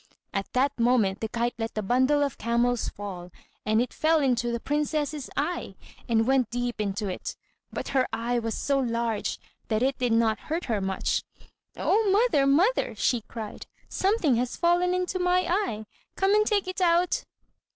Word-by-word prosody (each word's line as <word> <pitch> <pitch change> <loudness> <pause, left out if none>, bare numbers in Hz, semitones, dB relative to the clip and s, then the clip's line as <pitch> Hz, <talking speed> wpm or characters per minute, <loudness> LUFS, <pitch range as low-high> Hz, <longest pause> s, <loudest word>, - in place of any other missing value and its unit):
At 195 -1 -3
that 270 +1 +1
moment 230 -5 +2
the 220 - -2
kite 235 +2 -1
let 225 0 -3
the 215 - -2
bundle 260 +7 +3
of 280 -3 -3
camels 235 +1 +1
fall, 185 -3 -7 0.4
and 215 +1 +3
it 245 - -1
fell 320 +1 +3
into 245 -4 +1
the 235 - -2
princess's 295 +1 -2
eye, 295 - -2 0.3
and 225 -1 +3
went 260 -2 +2
deep 245 -2 -2
into 200 0 -2
it; 185 - -5 0.4
but - - -5
her 260 -2 +2
eye 240 +1 -1
was 225 -1 -3
so 280 -1 0
large 230 -3 -1 0.3
that 220 +1 0
it 270 +1 0
did 245 -2 +1
not 225 -2 +2
hurt 330 +3 -1
her 220 -4 -1
much. 190 0 -1 0.5
"Oh, 430 0 +2
mother! 395 - +3
mother!" 355 - +3
she 240 -3 +1
cried, 220 -3 -7 0.2
"something 375 - +2
has 245 +1 -2
fallen 355 +1 +2
into 365 0 -1
my 360 0 +2
eye! 345 - -1 0.3
come 390 +1 +2
and 425 0 +4
take 405 -3 +1
it 370 0 -4
out." 345 0 +3
255 Hz, 175 wpm, -27 LUFS, 225-340 Hz, 0.5 s, and